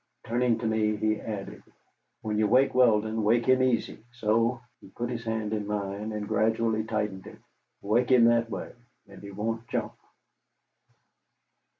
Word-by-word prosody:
Turning 120 0 +1
to 115 - -5
me, 110 -1 +1
he 110 +1 -1
added: 105 -3 -6 0.6
"When 105 -1 -1
you 110 - +3
wake 130 +5 +3
Weldon, 110 -3 +3
wake 115 +3 +2
him 130 0 +4
easy. 125 -4 0
So." 115 +1 +1 0.2
He - - -15
put 120 +5 -5
his 115 -1 -4
hand 110 -2 -2
in 105 -2 -3
mine, 105 +1 -3
and 105 -1 -4
gradually 110 0 +1
tightened 105 -4 -3
it. - - -11 0.5
"Wake 115 +5 +1
him 125 -3 +6
that 115 0 +3
way, 105 - -6 0.3
and - - -14
he 100 - -9
won't 115 +3 -4
jump." - - -3
110 Hz, 160 wpm, -27 LUFS, 105-115 Hz, 0.6 s, him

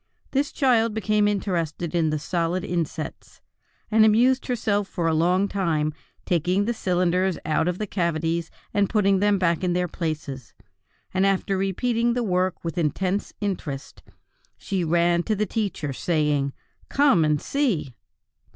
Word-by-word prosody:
This 285 +1 0
child 230 -5 +2
became 215 -1 +2
interested 175 -5 -2
in 165 -2 +2
the 155 - 0
solid 170 +3 -1
insets, 165 -2 -4 0.5
and 220 0 +6
amused 240 +5 +4
herself 210 -5 0
for 175 -3 -3
a 165 - +2
long 180 +5 +2
time 160 -7 0 0.3
taking 180 +4 +1
the 235 - 0
cylinders 180 -2 +1
out 155 +1 +1
of 180 0 -1
the 215 - -2
cavities 170 -3 -1 0.2
and 205 -1 +2
putting 200 -3 +3
them 205 0 +3
back 170 -2 +1
in 180 -1 +1
their 180 0 0
places; 155 -6 -5 0.6
and 190 0 +2
after 195 0 +1
repeating 230 +5 0
the 245 - 0
work 185 -3 0
with 170 +1 -3
intense 185 +5 -1
interest, 160 -9 -4 0.6
she 190 -3 -2
ran 170 +1 +2
to 215 +4 -1
the 210 +1 0
teacher, 200 -11 -2
saying: 150 -2 0 0.4
"Come 275 - +4
and 150 -1 +2
see!" 210 - -1
180 Hz, 150 wpm, -24 LUFS, 165-205 Hz, 0.6 s, and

